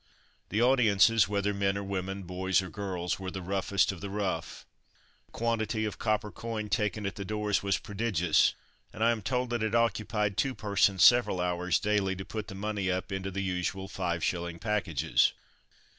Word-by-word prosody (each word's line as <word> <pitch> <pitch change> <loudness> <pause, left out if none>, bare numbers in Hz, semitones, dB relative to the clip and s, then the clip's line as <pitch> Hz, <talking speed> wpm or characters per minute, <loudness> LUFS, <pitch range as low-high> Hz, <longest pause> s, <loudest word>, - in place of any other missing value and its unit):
The 110 +3 +1
audiences, 115 -5 +5
whether 100 0 0
men 100 0 0
or 100 - -3
women, 95 0 -4
boys 95 +1 0
or 90 - -8
girls, 95 -3 -3
were 95 -1 -4
the 95 -1 -6
roughest 95 +1 +1
of 95 - -9
the 100 - -5
rough. 95 -5 -3 0.6
The - - -32
quantity 110 -1 -1
of 105 -2 -5
copper 110 -1 0
coin 110 -2 -5
taken 105 0 -1
at 100 - -4
the 100 - -4
doors 105 -1 -1
was 100 -1 +1
prodigious; 100 -6 +1 0.4
and 110 - -3
I 115 - +5
am 115 -2 -2
told 125 +2 -1
that 120 -2 -1
it 110 +1 0
occupied 105 -3 0
two 135 -2 0
persons 100 -3 +2
several 120 -6 +6
hours, 90 0 0
daily, 100 -2 +1
to 95 +1 -7
put 110 +2 -5
the 100 - -8
money 100 -1 -2
up 95 +2 -2
into 95 0 -3
the 100 +1 -3
usual 95 +1 -2
five 85 -4 -2
shilling 85 -1 -2
packages. 85 - +1
100 Hz, 185 wpm, -29 LUFS, 95-110 Hz, 0.6 s, several